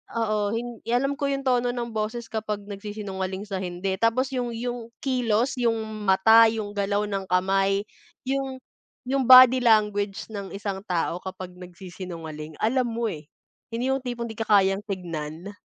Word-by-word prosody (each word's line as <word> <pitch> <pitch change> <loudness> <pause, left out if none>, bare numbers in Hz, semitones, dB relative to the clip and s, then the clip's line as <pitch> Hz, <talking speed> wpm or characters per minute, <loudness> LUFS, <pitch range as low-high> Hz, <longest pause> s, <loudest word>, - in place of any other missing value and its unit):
oo. 215 -2 0
Hin 240 -1 -5
alam 275 +4 +1
ko 280 - 0
'yung 275 0 -2
tono 245 -1 +2
ng 235 -1 -4
boses 220 +2 -3
kapag 215 -2 -3
nagsisinungaling 200 -2 -5
sa 195 -2 -3
hindi 185 +1 -2
tapos 255 +4 +2
'yung 245 -1 -1
'yung 240 0 -4 0.2
kilos 250 -2 +1
'yung 230 -2 +2 0.3
mata, 220 +4 +7
'yung 215 -2 -4
galaw 200 +1 0
ng 195 -1 -3
kamay, 195 +2 +2 0.4
'yung 270 -1 -2 0.5
'yung 270 0 +1
body 255 0 +10
language 210 -3 +2
ng 200 -2 -6
isang 200 -1 -4
tao 175 0 -1
kapag 185 -1 -7
nagsisinungaling 175 -4 -8
alam 250 +2 +2
mo, 230 0 -2
eh. 150 -2 -9 0.5
Hindi 255 +3 0
'yung 270 - +1
tipong 240 -2 -4
di - - -10
ka 225 - -1
kayang 195 -1 +4
tingnan. 170 -1 -5
210 Hz, 155 wpm, -25 LUFS, 190-240 Hz, 0.5 s, body